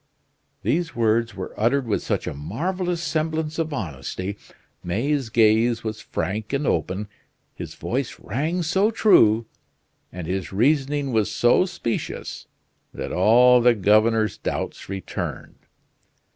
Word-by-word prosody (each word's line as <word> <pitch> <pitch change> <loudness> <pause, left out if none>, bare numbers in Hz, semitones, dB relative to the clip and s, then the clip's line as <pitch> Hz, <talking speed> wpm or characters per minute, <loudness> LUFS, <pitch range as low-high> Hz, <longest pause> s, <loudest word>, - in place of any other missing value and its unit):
These 165 +1 0
words 115 0 +1
were 95 - -6
uttered 125 +5 +2
with 110 -3 0
such - - -2
a - - -3
marvelous 175 - -3
semblance 160 0 -2
of 160 -1 -1
honesty, 90 - -4 0.5
May's 125 +8 -1
gaze 115 +1 +3
was 110 -1 -4
frank 105 - -4
and 140 +1 0
open, 100 -2 -1 0.5
his - - -8
voice 130 +1 -3
rang 160 +8 -2
so 190 +6 +2
true, 115 - +4 0.7
and 90 -2 -6
his 95 +2 -3
reasoning 140 +5 +1
was 110 -3 +1
so 120 +9 +4
specious, 120 -10 -4 0.4
that - - -6
all 120 +6 +6
the 120 0 +5
governor's 110 +2 +3
doubts - - -4
returned. 95 -2 -5
115 Hz, 125 wpm, -23 LUFS, 105-150 Hz, 0.7 s, all